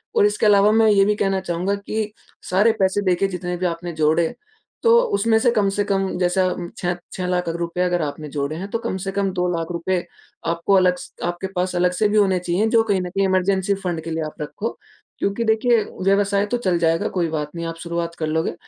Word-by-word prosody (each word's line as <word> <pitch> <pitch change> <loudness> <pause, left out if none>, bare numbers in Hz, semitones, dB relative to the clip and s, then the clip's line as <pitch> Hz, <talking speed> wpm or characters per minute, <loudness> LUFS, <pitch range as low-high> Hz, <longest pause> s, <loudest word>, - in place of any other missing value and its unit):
और - - +5
इसके 210 +1 +1
अलावा 205 0 +5
मैं 220 0 +4
ये 200 -1 +5
भी 210 +1 +2
कहना 195 -2 0
चाहूँगा 180 +2 -1
कि 210 +1 -3 0.4
सारे 205 +5 +4
पैसे 190 +1 +2
देखिए 185 +1 +2
जितने 180 -1 -4
भी 180 - -2
आपने 170 0 -3
जोड़े 160 +1 +2 0.5
तो 465 0 +6 0.2
उसमें 220 +2 +3
से 240 +1 +3
कम 210 -4 +2
से 205 +1 0
कम 195 -1 0
जैसे 180 +1 +2 0.4
6- 175 0 -1 0.2
₹6,00,000 180 -1 -2
अगर 175 -1 +1
आपने 150 +1 -4
जोड़े 145 +1 -3
हैं 190 +3 -5
तो 230 - -1
कम 230 -5 -3
से 195 - -2
कम 195 -1 0
₹2,00,000 175 0 -1 0.5
आपको 170 +4 0
अलग 180 -1 +4
स - - -10
आपके 175 +2 -3
पास 180 0 -1
अलग 180 0 +2
से 210 +4 +2
भी 215 - +1
होने 190 -3 +3
चाहिए 180 +5 0
जो 225 - +6
कहीं 200 -4 0
न 180 - -4
कहीं 195 +1 0
इमरजेंसी 190 +1 +1
फंड 175 -3 -2
के 165 - -5
लिए 160 0 -2
आप 155 - -6
रखो 205 +9 -4 0.5
क्योंकि 200 +4 -1
देखिए 220 +1 +3 0.2
व्यवसाय 200 +1 +2
तो 245 - 0
चल 185 -7 0
जाएगा 165 0 +1
कोई 170 -2 +1
बात 150 -2 -3
नहीं 170 0 -4
आप 165 0 -6
शुरुआत 170 0 -3
कर 155 - -1
लोगे। 160 +1 -1
185 Hz, 215 wpm, -21 LUFS, 170-200 Hz, 0.5 s, तो